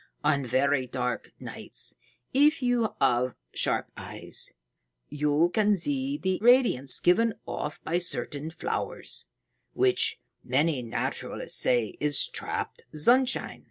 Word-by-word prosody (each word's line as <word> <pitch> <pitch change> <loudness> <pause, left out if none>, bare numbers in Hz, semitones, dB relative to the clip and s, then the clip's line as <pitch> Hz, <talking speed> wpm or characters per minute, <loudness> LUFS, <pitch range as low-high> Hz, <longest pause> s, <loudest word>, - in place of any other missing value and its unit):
On 145 -2 +2
very 130 +1 +1
dark 125 0 -3
nights, - - -3 0.4
if 290 +1 +4
you 235 -3 +1
have 125 +1 +2 0.2
sharp - - 0
eyes, - - -7 0.6
you 150 +3 +1
can 210 0 +3
see 270 - -2
the 190 -7 -1
radiance 230 - +5
given 220 +6 +3
off 150 - -5
by 170 +2 0
certain 160 -3 -4
flowers, 165 - -5 0.5
which 450 +4 +3 0.2
many 140 +2 +1
naturalists 115 -2 -3
say 120 -4 +1
is 145 -2 +1
trapped - - -4
sunshine. 245 - +2
165 Hz, 115 wpm, -27 LUFS, -, 0.6 s, radiance